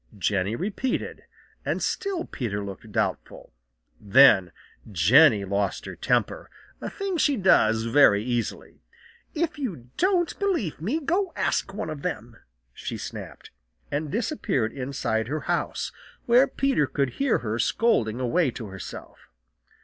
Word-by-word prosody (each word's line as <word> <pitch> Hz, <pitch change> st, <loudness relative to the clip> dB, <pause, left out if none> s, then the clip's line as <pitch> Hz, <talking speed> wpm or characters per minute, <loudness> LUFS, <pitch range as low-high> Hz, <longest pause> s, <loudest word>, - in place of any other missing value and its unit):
Jenny 100 Hz, +2 st, 0 dB
repeated, 210 Hz, -, -3 dB, 0.4 s
and -, -, -1 dB
still 395 Hz, -5 st, -2 dB
Peter 105 Hz, -5 st, -4 dB
looked 100 Hz, -1 st, -9 dB
doubtful. -, -, -3 dB, 0.5 s
Then 105 Hz, -4 st, +6 dB, 0.4 s
Jenny 105 Hz, -, +5 dB
lost 100 Hz, +1 st, -1 dB
her -, -, -7 dB
temper, -, -, -1 dB, 0.3 s
a -, -, -4 dB
thing 395 Hz, -3 st, -3 dB
she 290 Hz, -4 st, +2 dB
does 110 Hz, -, +4 dB
very 115 Hz, -4 st, +5 dB
easily. 120 Hz, -1 st, -4 dB, 0.5 s
"If 320 Hz, -1 st, -1 dB
you 165 Hz, -, -5 dB
don't 360 Hz, -3 st, +1 dB
believe 340 Hz, -, -1 dB
me, 235 Hz, -, -1 dB
go 350 Hz, +5 st, 0 dB
ask -, -, 0 dB
one 195 Hz, -5 st, -4 dB
of 150 Hz, -2 st, -7 dB
them," -, -, -5 dB, 0.4 s
she -, -, -6 dB
snapped, -, -, -8 dB, 0.4 s
and 150 Hz, 0 st, -2 dB
disappeared 210 Hz, -, -1 dB
inside 125 Hz, -4 st, -2 dB
her 150 Hz, +3 st, -3 dB
house, -, -, -2 dB, 0.3 s
where 245 Hz, +3 st, +5 dB
Peter 270 Hz, -, +1 dB
could 140 Hz, -1 st, 0 dB
hear 275 Hz, -4 st, +3 dB
her 110 Hz, +2 st, -2 dB
scolding 120 Hz, -, +1 dB
away 135 Hz, +5 st, +1 dB
to 115 Hz, -3 st, -7 dB
herself. 95 Hz, -2 st, -10 dB
145 Hz, 135 wpm, -25 LUFS, -, 0.5 s, Then